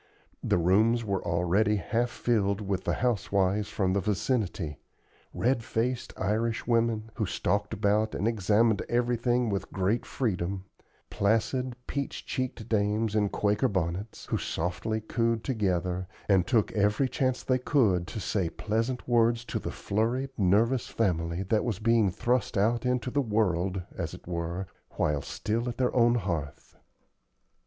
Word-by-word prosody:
The - - +2
rooms 110 +7 +3
were 100 -2 -1
already 90 +6 +2
half 115 +6 0
filled 100 -5 0
with 100 -3 -2
the - - +1
housewives 100 -3 +1
from 95 -2 0
the 100 - +2
vicinity; 100 - -1 0.5
red 120 -1 +1
faced 120 +3 -1
Irish 110 +3 0
women, 115 -2 +1
who 110 - 0
stalked 105 +4 -1
about 105 +1 +1
and 105 - 0
examined 110 0 +2
everything 120 0 +1
with 100 - -3
great 95 +5 0
freedom; 95 -6 -2 0.5
placid, 120 +5 +1
peach 140 -1 -4
cheeked 130 -4 -3
dames 105 0 +1
in 105 -2 +2
Quaker 105 +1 +1
bonnets, 95 +3 -3
who - - -1
softly 100 +6 -2
cooed 115 +1 0
together, 90 -6 -1 0.2
and 95 -3 +3
took 115 -5 +2
every 105 +5 +2
chance 130 0 -1
they 130 -1 +1
could 105 - +2
to 110 - -5
say 95 -3 -1
pleasant 115 +7 -2
words 115 0 +3
to - - -3
the - - -5
flurried, 120 +6 -1
nervous 110 +6 +2
family 85 -4 -1
that 105 +3 +1
was 115 -6 -1
being 115 -1 +3
thrust 120 +5 0
out 115 +4 +2
into 125 0 0
the 145 - +2
world, 95 -5 0
as - - -4
it - - -15
were, 85 +2 -3 0.3
while 75 -2 +1
still 115 - -2
at 120 - -6
their 125 -1 0
own 120 -1 +5
hearth. 85 - -4
110 Hz, 150 wpm, -28 LUFS, 95-120 Hz, 0.5 s, own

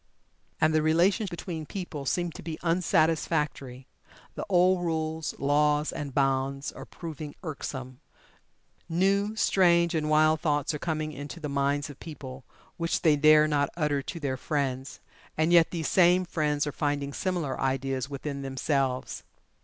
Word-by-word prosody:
And 155 0 +3
the 155 - +3
relations 180 +7 +2
between 165 -3 -6
people 160 -8 -6
seem 175 +2 0
to - - -10
be 160 -1 -5
unsatisfactory. 160 -6 0 0.5
The - - -6
old 180 -1 +4
rules, 160 -1 -2
laws, 150 +1 +2
and 145 -3 -5
bonds 135 0 0
are - - -10
proving 155 -3 -8
irksome. 130 -5 -6 0.9
New, 200 +5 +1
strange, 170 -5 +3
and 155 -2 -1
wild 155 0 +4
thoughts 145 -2 0
are 150 - -4
coming 155 -1 -2
into 145 +3 -8
the 150 -2 -4
minds 140 +1 0
of 140 - -15
people, 135 -5 -9 0.3
which 170 -1 -1
they 155 -2 +5
dare 155 +1 +6
not 145 -2 +1
utter 150 -3 +1
to 170 +5 -6
their 135 -4 -2
friends 135 -1 -3 0.4
and 160 +2 +2
yet 170 -1 +6
these 165 -3 -3
same 180 0 +4
friends 150 -4 0
are 145 - -2
finding 145 -1 -2
similar 175 -7 -2
ideas 135 0 -1
within 140 0 -5
themselves. 135 -1 -1
155 Hz, 150 wpm, -28 LUFS, 140-170 Hz, 0.9 s, dare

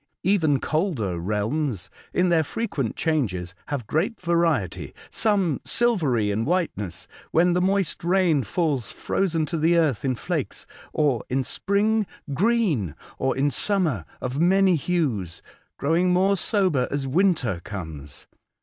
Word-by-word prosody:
Even 160 -7 +3
colder 140 - -1
realms, 105 - -2 0.2
in 180 0 +2
their 165 -2 +3
frequent 155 - -3
changes, 100 - -1
have 140 -6 -3
great 165 - -1
variety 170 - 0
— - - -19
some 195 -9 +1
silvery 150 - +2
in 105 +3 0
whiteness, 140 - -2 0.2
when 175 +2 +3
the 180 - +2
moist 195 -3 +1
rain 175 -4 +3
falls 140 - -1
frozen 165 -5 -1
to 165 +1 -3
the 165 +2 +3
earth 150 -10 +1
in 130 -2 0
flakes; - - -4 0.3
or 140 -7 +1
in 130 +1 0
spring, 205 +6 +1 0.3
green; 175 - +1 0.2
or 130 0 0
in 140 +1 +2
summer, 160 - +1 0.2
of 130 +4 -3
many 190 +1 +4
hues, 130 - -2 0.3
growing 165 +5 +2
more 190 +2 +3
sober 185 - +1
as 140 -1 -2
winter 140 - +1
comes. 80 -8 -8
155 Hz, 135 wpm, -24 LUFS, 120-185 Hz, 0.3 s, many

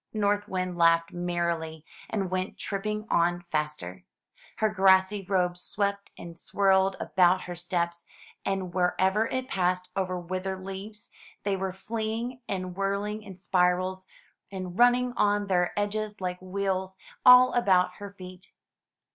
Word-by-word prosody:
North 205 -1 +1
Wind 185 -2 -3
laughed 165 0 +4
merrily, 170 -3 -2 0.2
and 195 -4 -2
went 185 +1 -2
tripping 210 +1 -3
on 175 +1 +2
faster. 150 - -3 0.5
Her 220 - +2
grassy 190 -1 +4
robe 180 -2 0
swept 200 +1 -2
and 170 -1 -10
swirled 190 0 +2
about 180 0 +3
her 180 - -6
steps, 170 -1 -2 0.4
and 190 -2 -2
wher 180 -1 +1
ever 195 +4 +2
it 260 0 -3
passed 180 -3 0
over 185 -2 -1
withered 185 +2 -4
leaves, 195 +2 -8 0.3
they 200 -1 0
went 190 -1 -3
fleeing 230 +4 -4
and 185 -2 -3
whirl 195 +1 -1
ing 210 +1 -4
in 200 -3 -10
spirals, 185 +1 +1 0.4
and 185 -2 -6
running 245 0 +4
on 205 0 +2
their 180 -3 +1
edges 210 0 -2
like 180 -1 -4
wheels, 190 0 -2 0.3
all 250 0 +8
about 185 -6 +3
her 205 -1 -7
feet. 185 -1 -12
190 Hz, 140 wpm, -28 LUFS, 180-205 Hz, 0.5 s, all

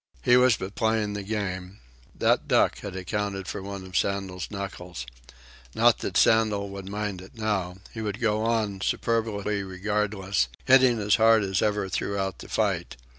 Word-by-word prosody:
He 125 - +5
was 125 -2 +5
but 95 +1 -6
playing 110 -2 0
the 100 - -3
game. 95 -2 -4 0.4
That - - +2
duck - - +3
had 100 -2 -7
accounted 95 +1 -3
for 105 - -4
one 100 0 -6
of 95 -1 -11
Sandel's 95 0 -1
knuckles. 90 -8 -6 0.7
Not - - +4
that - - -2
Sandel 105 -3 +3
would 100 -1 -7
mind 105 -2 -3
it 95 +5 -14
now. 100 -5 -1 0.2
He 110 - -5
would 105 0 -3
go 110 -2 +1
on, 110 -4 0
superbly 105 -3 -1
regardless, 95 -4 -1 0.2
hitting 130 -2 +6
as 105 0 +3
hard 110 -1 +5
as 95 -1 0
ever 105 -2 +1
throughout 95 -1 -2
the - - -10
fight. - - -1
100 Hz, 165 wpm, -26 LUFS, 95-110 Hz, 0.7 s, hitting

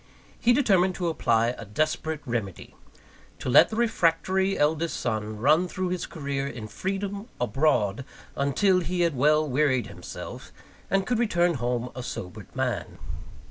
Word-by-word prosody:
He 240 - +4
determined 190 -8 +3
to 175 -2 -1
apply 115 -7 +2
a - - -6
desperate 155 +7 -1
remedy: 115 -7 -4 0.6
to 130 - -4
let - - +7
the 220 - -5
refractory 190 -3 +1
eldest 160 +3 +1
son 110 -2 -2
run 155 +10 +3
through 185 0 -3
his 180 0 -3
career 140 -3 -3
in 115 -6 -6
freedom, 195 - -4
abroad, 125 -2 +1 0.3
until 180 +8 +2
he 175 +1 -2
had 170 -4 +2
well 150 +4 +3
wearied 130 -3 +2
himself, - - -9 0.4
and 195 0 +1
could 240 +2 0
return 175 -7 +2
home 125 -2 -2
a 130 - -6
sobered 90 -7 -7
man. - - -2
155 Hz, 145 wpm, -26 LUFS, 125-185 Hz, 0.6 s, let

